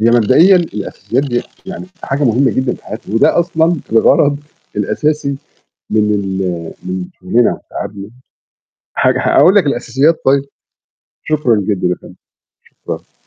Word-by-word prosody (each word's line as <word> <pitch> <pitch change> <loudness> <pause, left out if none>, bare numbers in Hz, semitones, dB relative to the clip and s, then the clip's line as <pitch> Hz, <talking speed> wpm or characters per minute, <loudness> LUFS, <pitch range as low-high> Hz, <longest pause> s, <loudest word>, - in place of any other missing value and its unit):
هي 115 +2 +4
مبدئيًا 130 - +5
الأساسيات 130 - -2
دِيَّة 120 -4 -1 0.2
يعني 190 -1 -7 0.2
حاجة 140 +2 -1
مهمة 125 +2 +3
جدًا 130 -1 -1
في - - -18
حياتي، 110 -1 -7
وده 115 - +3
أصلًا 170 0 +1 0.2
الغرض 140 +5 +4 0.4
الأساسي 150 -2 -1 0.5
من 105 -1 +2
ال 95 -4 -3
من 90 0 -4
شغلنا 115 +6 +2
وتعبنا. 100 0 -8 0.9
ه - - +4
هاقول 185 - +4
لك 190 -6 +4
الأساسيات 140 +4 +1
طيب. 135 +1 +3 0.8
شكرًا 150 -7 +1
جدًا 100 -4 0
يا 90 - 0
فندم. - - -15 0.5
شكرًا. - - -9
125 Hz, 130 wpm, -15 LUFS, 105-150 Hz, 0.9 s, مبدئيًا